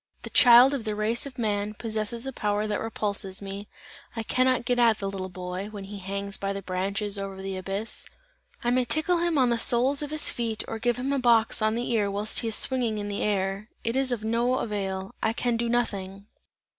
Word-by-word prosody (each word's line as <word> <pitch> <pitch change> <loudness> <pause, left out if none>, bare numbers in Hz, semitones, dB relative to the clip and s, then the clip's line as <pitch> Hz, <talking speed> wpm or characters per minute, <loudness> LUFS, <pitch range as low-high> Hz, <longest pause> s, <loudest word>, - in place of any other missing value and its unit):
The - - -8
child 245 +2 +8
of 270 -5 -2
the 215 -1 -2
race 225 +5 0
of 265 -2 -11
man, 210 -2 -1
possesses 220 +2 -3
a 270 - -4
power, 210 -2 -1
that 210 -1 -1
repulses 200 -3 -1
me; 200 +1 -7 0.5
I 225 - -3
cannot 255 +1 +1
get 245 0 +1
at 230 -2 +4
the 200 - -4
little 190 -1 -4
boy, 180 +2 -5
when 205 -2 -8
he 200 +1 -8
hangs 200 +1 -3
by 195 0 -2
the 200 0 -6
branches 195 +2 -2
over 195 -1 -6
the 195 0 -4
abyss. 195 +4 -3 0.6
I 240 - +1
may 255 0 +3
tickle 320 +7 +3
him 340 -2 +1
on 255 -3 +4
the 235 - +1
soles 255 +5 +3
of 295 - -3
his 305 0 +2
feet 225 -2 -2
or 225 - -5
give 240 +1 0
him 265 +3 -1
a 280 - +1
box 230 -3 +3
on 215 +1 +2
the 240 +1 -2
ear 210 -3 +1
whilst 205 +2 +1
he 230 - -2
is 220 - +2
swinging 245 -5 +2
in 205 0 -4
the 200 - -3
air, 195 +1 -1
it 230 +2 -1
is 265 -1 +2
of 230 -3 -2
no 235 +3 +1
avail. 195 -3 -3
I 220 - +1
can 240 0 0
do 235 0 -1
nothing!" 200 -5 -2
215 Hz, 225 wpm, -26 LUFS, 200-240 Hz, 0.6 s, child